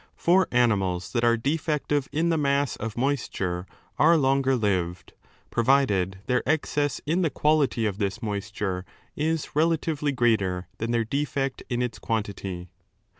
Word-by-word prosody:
For 185 +2 +3
animals 95 -7 +1
that 120 -2 +1
are 120 0 +4
defective 145 +1 -1
in 165 +3 +1
the 165 - +2
mass 140 -2 +1
of 115 +1 -6
moisture 100 -9 -1 0.3
are 165 +3 +6
longer 135 -1 +2
lived, 95 -6 -1 0.4
provided 115 -7 +2
their 125 - +1
excess 145 -2 0
in 165 +5 +1
the 165 - +2
466^ - - -22
quality 150 -6 +2
of 100 -3 -1
this 100 +1 -1
moisture 100 -3 -3 0.3
is 160 0 -2
relatively 155 -2 +1
greater 105 -8 +1
than 115 - -2
their 115 -1 +1
defect 135 +1 -2
in 125 -1 0
its 115 -4 -4
quantity. 100 -5 -3
125 Hz, 145 wpm, -26 LUFS, 105-145 Hz, 0.4 s, are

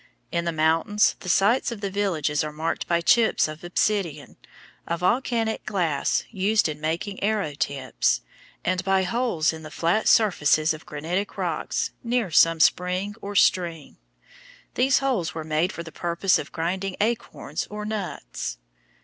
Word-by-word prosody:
In 170 0 -1
the 170 - 0
mountains 165 +6 +2
the 180 - -7
sites 210 +8 +3
of 230 - -6
the 200 -1 -3
villages 160 -8 0
are 150 - -4
marked 160 +2 -3
by 170 -1 +2
chips 225 +3 +4
of 155 +2 -9
obsidian 175 -4 -1 0.5
(a 170 - -1
volcanic 225 +4 0
glass 170 -9 0
used 210 0 +2
in 150 -1 -6
making 175 +6 -3
arrow 205 -7 0
tips) 140 -4 0 0.4
and 185 +1 0
by 195 0 +2
holes 185 -6 0
in 160 - -8
the 155 - -9
flat 170 +7 0
surfaces 160 -7 +4
of 155 - -11
granitic 170 +7 -3
rocks - - -2
near 235 -5 0
some 165 +1 +5
spring 180 +5 +2
or 205 +1 -6
stream. 170 -5 +1 0.8
These 265 +2 +3
holes 215 -14 0
were 160 - -4
made 155 +3 0
for 170 - -6
the 165 - -10
purpose 175 +3 +1
of - - -7
grinding 185 +3 -2
acorns 230 +3 -2
or 210 0 -6
nuts. 190 - -4
180 Hz, 155 wpm, -25 LUFS, 160-205 Hz, 0.8 s, some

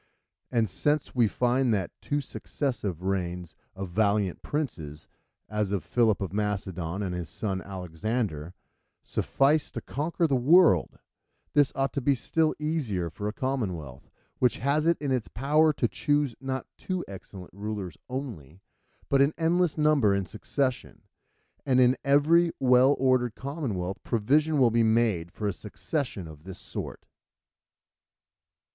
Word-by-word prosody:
And 115 -3 +2
since 145 - 0
we 120 -3 +4
find 125 +3 +1
that 95 -3 -2
two 145 0 -1
successive 120 - -4
reigns 90 -3 -2 0.2
of 95 -2 -6
valiant 100 -1 +1
princes, 80 - -4 0.4
as 105 -1 -1
of 100 -3 -1
Philip 115 -4 +2
of 95 -1 -3
Macedon 95 -3 -2
and 90 -2 -3
his 90 -2 -4
son 95 -3 -3
Alexander, 90 -2 -3 0.5
suffice 145 +2 +1
to - - -5
conquer 165 +4 -1
the 140 -4 +2
world, 160 +8 +5 0.6
this 145 -2 +4
ought 135 0 0
to 140 - -1
be 140 +2 +3
still 160 +4 +1
easier 130 - -2
for 105 +6 -5
a - - -1
commonwealth, 100 - -4 0.3
which 125 -2 +3
has 145 +4 +1
it 170 - +4
in 145 -2 -2
its 125 -4 0
power 150 +5 +3
to 125 - +1
choose, 145 +1 0
not 130 -1 -3
two 185 -2 -3
excellent 95 -1 -10
rulers 100 -4 -5
only, 110 - -6 0.5
but 135 -1 +3
an 140 +3 +3
endless 170 0 +2
number 150 -10 +4
in 100 -1 -1
succession. 130 +6 -3 0.6
And 130 -2 +2
in 125 0 +5
every 155 +5 +4
well 130 +2 +5
ordered 130 -3 +2
commonwealth 115 - -4
provision 145 +8 +2
will 125 -4 +5
be 115 +1 +3
made 110 -7 +2
for 105 - -6
a 100 - 0
succession 105 - -4
of 75 -1 -12
this 95 -1 -8
sort. - - -7
120 Hz, 145 wpm, -27 LUFS, 95-140 Hz, 0.6 s, world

